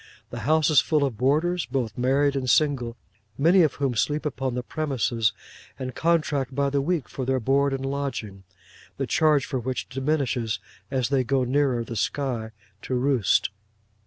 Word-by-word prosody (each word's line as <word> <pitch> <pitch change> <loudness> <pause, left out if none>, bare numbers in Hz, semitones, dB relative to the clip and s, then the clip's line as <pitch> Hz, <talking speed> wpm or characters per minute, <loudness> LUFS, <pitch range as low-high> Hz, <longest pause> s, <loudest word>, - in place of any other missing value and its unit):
The 120 - -5
house 155 0 +4
is 150 - +6
full 150 -2 +1
of 135 -5 -1
boarders, 155 +7 +1
both 120 -6 -2
married 135 +3 +2
and 130 -2 -1
single, 125 -3 +2 0.4
many 170 +6 +5
of 155 -4 +2
whom 140 -3 0
sleep 150 +7 0
upon 135 -4 -2
the 125 - -2
premises, 120 -6 0 0.5
and 130 -1 -5
contract 150 -5 0
by 140 0 +1
the 140 0 +1
week 160 -1 -1
for 135 - -5
their 130 +1 +1
board 140 +4 +2
and 135 0 -3
lodging: 135 -8 -4 0.5
the - - -1
charge 150 -3 +3
for 130 - -2
which 125 +1 -3
diminishes 130 -5 -1 0.3
as 130 -3 0
they 135 -2 +2
go 130 +1 +1
nearer 130 -2 +1
the 115 0 -7
sky 120 -1 -2 0.3
to 130 - -3
roost. 125 -7 +2
135 Hz, 170 wpm, -25 LUFS, 125-145 Hz, 0.5 s, is